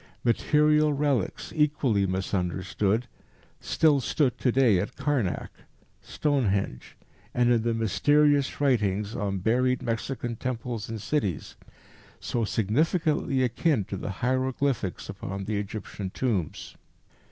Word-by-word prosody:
Material 150 +5 +3
relics, 140 -7 -1
equally 140 -10 +2
misunderstood, 95 +4 -1 0.5
still 150 -3 +3
stood 130 0 +1
to 125 - +2
day 120 -7 +4
at 105 +7 -4
Karnac, 140 -9 -1 0.5
Stonehenge, 105 - -1 0.4
and 120 0 +3
in 120 -2 +3
the 115 0 0
mysterious 145 +6 +2
writings 105 -7 +1
on 100 -1 -2
buried 125 +6 +1
Mexican 120 0 -3
temples 120 -3 -4
and 110 -1 -4
cities, 105 - -2 0.6
so 120 - -2
significantly 135 - +1
akin 125 0 +1
to 100 - -6
the 95 - -5 0.2
hieroglyphics 130 -4 -1
upon 95 +1 -6
the 105 0 -1
Egyptian 100 -1 -5
tombs. 100 - -2
120 Hz, 110 wpm, -27 LUFS, 100-140 Hz, 0.6 s, day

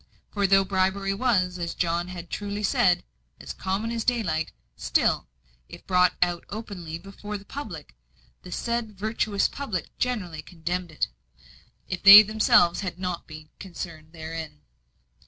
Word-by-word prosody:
For 200 -2 +1
though 195 0 +5
bribery 190 +1 0
was, 185 -6 +1
as 170 -1 -3
John 170 0 0
had 175 -1 -8
truly 205 0 -4
said, 180 -3 +3 0.4
"as - - -7
common 195 +4 -2
as 230 -1 -2
daylight," 180 -11 0 0.2
still, - - +1 0.4
if - - -12
brought 180 -1 +3 0.3
openly 195 -7 -6
before 200 +3 -7
the 200 - -15
public, 190 - -8 0.5
the 180 - -11
said 235 -1 -3
virtuous 210 -1 0
public 220 - -5
generally 190 -11 -2
condemned 175 +2 -4
it, 155 - -1 0.8
if 185 - -4
they 200 +2 +12
themselves 210 -5 +4
had 185 -4 -4
not 180 -2 -4
been 155 -1 -11
concerned 165 -4 -8
therein. 160 - -7
185 Hz, 140 wpm, -26 LUFS, 170-210 Hz, 0.8 s, they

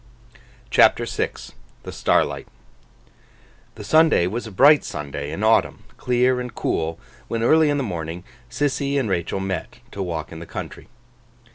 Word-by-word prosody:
CHAPTER - - +5
VI - - -1 0.5
THE - - -7
STARLIGHT - - 0 1.3
THE - - -9
Sunday 160 - +4
was 110 +6 -3
a - - -9
bright 145 +9 +6
Sunday 70 0 -5
in 95 +7 -4
autumn, 110 +1 +2
clear 125 +1 +1
and 125 -2 -6
cool, 80 +1 -2 0.3
when 115 0 -2
early 155 +4 +4
in 145 - +1
the 140 - -1
morning 85 -4 -5 0.3
Sissy 140 +1 -1
and 130 - -1
Rachael 85 +1 -1
met, 95 -3 -4
to 100 - -6
walk 85 -4 -4
in 80 - -8
the 85 - -9
country. - - -8
110 Hz, 150 wpm, -22 LUFS, 85-135 Hz, 1.3 s, bright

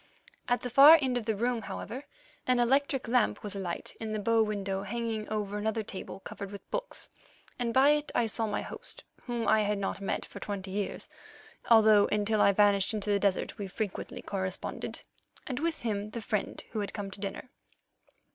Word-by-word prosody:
At 245 - +1
the 250 - -2
far 285 +6 +10
end 260 -3 0
of 240 -2 -2
the 220 - +1
room, 240 +2 0
however, 240 +4 -6 0.5
an 250 -1 +3
electric 270 +2 +2
lamp 240 -1 +2
was 205 -1 -3
alight 185 -3 -4
in 220 -1 -4
the 215 - -1
bow 225 +2 +3
window 200 -3 -1
hanging 220 +1 -3
over 210 -1 -2
another 220 +1 -1
table 195 -1 -7
covered 200 0 -7
with 200 0 -10
books, - - -3 0.5
and 240 -1 0
by 265 +4 +6
it 295 0 0
I 235 - +3
saw 225 0 -1
my 210 - -2
host, - - -8 0.2
whom 240 -2 -2
I 220 0 +5
had 210 0 +1
not 200 0 -3
met 195 - -2
for - - -10
twenty 195 -2 -5
years, 200 0 -2 0.6
although 215 -3 +7
until 210 0 +1
I 200 - +6
vanished 200 +1 +3
into 210 0 -1
the 200 - +3
desert 200 +2 0
we 200 - -3
frequently 200 +1 -4
corresponded, 190 -2 -4 0.4
and 255 -2 -3
with 325 -2 -2
him 210 -2 -2
the 230 +2 -5
friend 210 -1 -2
who 220 - -2
had 205 - -3
come 200 -2 -4
to 195 - -7
dinner. 200 +6 -5
215 Hz, 195 wpm, -30 LUFS, 200-240 Hz, 0.6 s, far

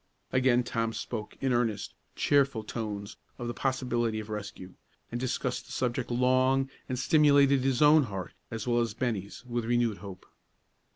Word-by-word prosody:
Again 130 -1 +4
Tom 115 -1 -1
spoke, 110 -2 -5
in 135 -2 +1
earnest, 115 -5 0 0.2
cheerful 135 -6 +2
tones, 105 -2 -5 0.2
of 120 - -5
the 120 - -2
probability 120 -3 -1
of 110 0 -7
rescue; 100 -3 -6 0.4
and 120 - -3
discussed 130 0 -2
the - - -12
subject 125 -1 -1
long, 130 +2 +2 0.2
and 130 - -1
stimulated 140 -2 +5
his 135 +1 +2
own 150 -1 +6
heart, 95 -5 -6 0.2
as 115 -2 -5
well 120 0 +3
as 115 -3 -2
Bennie's, 115 -3 -3
with 120 -1 -2
renewed 120 -3 +1
hope. 95 -2 -10
120 Hz, 160 wpm, -29 LUFS, 110-130 Hz, 0.4 s, own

